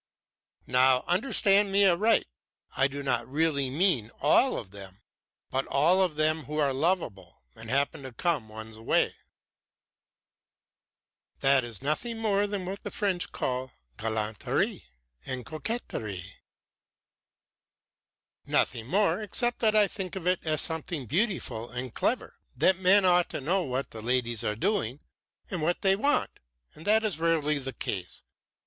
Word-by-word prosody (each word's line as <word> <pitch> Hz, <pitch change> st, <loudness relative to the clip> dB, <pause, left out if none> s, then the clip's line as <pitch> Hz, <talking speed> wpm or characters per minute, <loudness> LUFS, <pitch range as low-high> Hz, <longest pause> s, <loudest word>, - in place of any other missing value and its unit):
"Now 125 Hz, 0 st, +4 dB
understand 200 Hz, 0 st, +3 dB
me 200 Hz, +1 st, +4 dB
aright 200 Hz, +5 st, +3 dB, 0.5 s
I 135 Hz, +1 st, +3 dB
do 140 Hz, +1 st, -6 dB
not 120 Hz, -3 st, 0 dB
really 140 Hz, -1 st, +1 dB
mean 140 Hz, -, +2 dB
all 200 Hz, -, +4 dB
of 95 Hz, -5 st, -8 dB
them, 100 Hz, -1 st, -11 dB, 0.5 s
but 135 Hz, +1 st, -1 dB
all 170 Hz, +7 st, +3 dB
of 180 Hz, -5 st, +1 dB
them 155 Hz, 0 st, +1 dB
who 150 Hz, +4 st, -5 dB
are 145 Hz, -3 st, +2 dB
lovable 130 Hz, -, -2 dB
and 110 Hz, 0 st, -9 dB
happen 140 Hz, +2 st, 0 dB
to 130 Hz, -1 st, -8 dB
come 135 Hz, -3 st, -1 dB
one's 110 Hz, 0 st, -9 dB
way." 115 Hz, -, +1 dB, 2.3 s
"That 135 Hz, -1 st, +4 dB
is 115 Hz, -5 st, -5 dB
nothing 225 Hz, -, -2 dB
more 205 Hz, -2 st, +1 dB
than 200 Hz, -2 st, -4 dB
what 195 Hz, +2 st, -5 dB
the -, -, -6 dB
French 195 Hz, -4 st, -1 dB
call 130 Hz, 0 st, -3 dB, 0.3 s
galanterie 110 Hz, -1 st, -1 dB, 0.4 s
and 125 Hz, -, -5 dB
coquetterie." 110 Hz, -, -5 dB, 2.1 s
"Nothing 115 Hz, -2 st, 0 dB
more 195 Hz, +3 st, +2 dB
except 240 Hz, +4 st, -1 dB
that 215 Hz, -2 st, +2 dB
I 210 Hz, -1 st, +5 dB
think 190 Hz, -2 st, -5 dB
of 185 Hz, -3 st, -6 dB
it 180 Hz, 0 st, +1 dB
as 155 Hz, -1 st, +3 dB
something 160 Hz, -3 st, -2 dB
beautiful 145 Hz, -, -1 dB
and 125 Hz, -1 st, -5 dB
clever. -, -, -2 dB
And -, -, -18 dB
then 190 Hz, 0 st, +4 dB
men 190 Hz, +2 st, +5 dB
ought 180 Hz, -1 st, +4 dB
to -, -, -4 dB
know 175 Hz, +8 st, +1 dB
what 130 Hz, +1 st, -3 dB
the 110 Hz, -, -8 dB
ladies 120 Hz, -1 st, 0 dB
are 105 Hz, -, -1 dB
doing 145 Hz, -, -1 dB, 0.5 s
and 180 Hz, -4 st, -3 dB
what 170 Hz, +3 st, -1 dB
they 195 Hz, -1 st, +4 dB
want; 285 Hz, +9 st, 0 dB, 0.3 s
and 155 Hz, -, -13 dB
that 220 Hz, +1 st, +4 dB
is 200 Hz, -8 st, -1 dB
rarely 155 Hz, -3 st, +1 dB
the 135 Hz, -1 st, -5 dB
case. 95 Hz, -7 st, -5 dB
150 Hz, 150 wpm, -28 LUFS, 125-190 Hz, 2.3 s, I